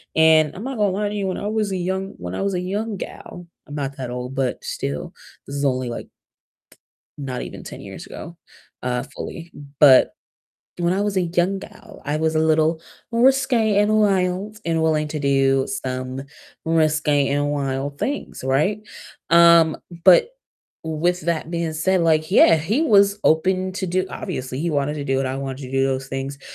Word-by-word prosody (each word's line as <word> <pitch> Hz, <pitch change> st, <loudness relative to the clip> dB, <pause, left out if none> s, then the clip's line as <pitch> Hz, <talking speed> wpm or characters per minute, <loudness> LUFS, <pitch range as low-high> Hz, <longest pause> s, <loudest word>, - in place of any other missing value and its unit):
and 160 Hz, -1 st, +5 dB
I'm 195 Hz, -, -7 dB
not 265 Hz, 0 st, -4 dB
gonna 205 Hz, -2 st, +2 dB
lie 205 Hz, +2 st, -1 dB
to 210 Hz, -, -5 dB
you, 200 Hz, -2 st, -2 dB
when 185 Hz, -, -2 dB
I 205 Hz, -, -4 dB
was 215 Hz, -1 st, -1 dB
a 190 Hz, -, -1 dB
young 190 Hz, +2 st, -3 dB
when 90 Hz, 0 st, -6 dB
I -, -, -3 dB
was 195 Hz, -1 st, -1 dB
a 180 Hz, -, 0 dB
young 205 Hz, +3 st, -3 dB
gal- 175 Hz, -1 st, -9 dB, 0.2 s
I'm 145 Hz, -, -8 dB
not 140 Hz, -1 st, -4 dB
that 130 Hz, -2 st, -5 dB
old, 125 Hz, +1 st, -5 dB
but 130 Hz, -2 st, -2 dB
still, 70 Hz, +1 st, -4 dB, 0.3 s
this 140 Hz, -, -6 dB
is 140 Hz, -, -2 dB
only 130 Hz, -2 st, 0 dB
like 120 Hz, -, -6 dB, 1.1 s
not 130 Hz, -3 st, -4 dB
even -, -, -8 dB
10 -, -, -9 dB
years -, -, -9 dB
ago, 170 Hz, -, -9 dB, 0.5 s
uh, 125 Hz, 0 st, -1 dB
fully, 170 Hz, 0 st, -7 dB, 0.3 s
but 135 Hz, -3 st, +7 dB, 0.7 s
when 175 Hz, +1 st, +1 dB
I 195 Hz, -, 0 dB
was 205 Hz, -1 st, -1 dB
a 185 Hz, -, +3 dB
young 175 Hz, +3 st, 0 dB
gal, -, -, -13 dB
I 145 Hz, +1 st, -1 dB
was 160 Hz, 0 st, 0 dB
a -, -, +2 dB
little 160 Hz, +1 st, +2 dB, 0.3 s
more 235 Hz, +1 st, +2 dB
risque, 255 Hz, -6 st, +3 dB
and 210 Hz, +1 st, +3 dB
wild, 195 Hz, +1 st, 0 dB
and 165 Hz, -1 st, +1 dB
willing 155 Hz, -1 st, +1 dB
to 150 Hz, 0 st, -4 dB
do 135 Hz, -1 st, +2 dB
some 130 Hz, -7 st, -4 dB, 0.4 s
risque 155 Hz, -3 st, +2 dB
and 145 Hz, +1 st, 0 dB
wild 140 Hz, 0 st, -3 dB
things, 280 Hz, -, -4 dB
right? 150 Hz, +11 st, +1 dB, 0.5 s
Um, 170 Hz, -1 st, +6 dB, 0.3 s
but 185 Hz, -, +7 dB, 0.6 s
with 165 Hz, +3 st, -1 dB
that 165 Hz, 0 st, -2 dB
being 170 Hz, -2 st, -2 dB
said, 180 Hz, +3 st, +1 dB
like, 155 Hz, 0 st, +2 dB
yeah, 170 Hz, -, +7 dB
he 200 Hz, -, 0 dB
was 200 Hz, -7 st, +4 dB
open 185 Hz, +4 st, +2 dB
to 190 Hz, 0 st, -4 dB
do 185 Hz, +1 st, 0 dB
obviously 130 Hz, -9 st, -5 dB
he 170 Hz, +1 st, -1 dB
wanted 145 Hz, 0 st, 0 dB
to 145 Hz, -, -4 dB
do 135 Hz, -1 st, 0 dB
what 135 Hz, 0 st, 0 dB
I 130 Hz, -, -3 dB
wanted 135 Hz, 0 st, -5 dB
to 125 Hz, -, -10 dB
do 135 Hz, 0 st, +2 dB
those 135 Hz, 0 st, -2 dB
things, 135 Hz, +1 st, -5 dB
160 Hz, 190 wpm, -22 LUFS, 140-190 Hz, 1.1 s, but